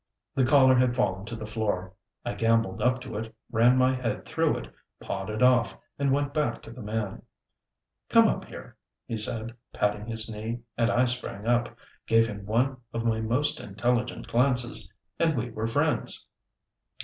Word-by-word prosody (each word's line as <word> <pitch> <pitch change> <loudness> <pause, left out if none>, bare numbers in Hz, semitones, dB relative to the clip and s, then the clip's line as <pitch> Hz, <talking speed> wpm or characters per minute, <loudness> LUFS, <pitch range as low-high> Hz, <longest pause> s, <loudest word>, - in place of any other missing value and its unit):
The 135 - +2
collar 130 -1 +6
had 125 -1 +3
fallen 95 -4 0
to 115 - -5
the 110 -1 -6
floor. 105 -4 -2 0.3
I - - -2
gambolled 115 -4 +1
up 125 +3 +2
to 120 -5 -6
it, 110 +1 -6 0.2
ran 120 +3 +5
my 130 0 +4
head 125 -4 -3
through - - +1
it, - - -9 0.3
pawed 95 +1 -4
it 110 +2 -1
off, 125 -2 +4 0.2
and 140 -1 +2
went 140 +1 0
back 150 0 -1
to - - -10
the 125 +2 -10
man. 105 -2 -3 0.9
"Come - - +6
up - - -1
here," - - -11 0.3
he 115 - -4
said 110 +1 0 0.2
patting 105 +1 -1
his 115 -1 -2
knee, 110 +2 -5
and 115 0 +2
I 125 +2 +3
sprang 120 -4 -3
up, 120 0 +1 0.3
gave 115 0 +5
him 100 -3 -7
one 125 +5 +1
of 115 0 -3
my 110 -1 +1
most 125 +7 0
intelligent 120 +4 -1
glances, 125 0 +1 0.3
and 160 -4 +2
we 120 +1 -2
were 110 +1 -2
friends. 115 - +1
115 Hz, 175 wpm, -27 LUFS, 110-125 Hz, 0.9 s, collar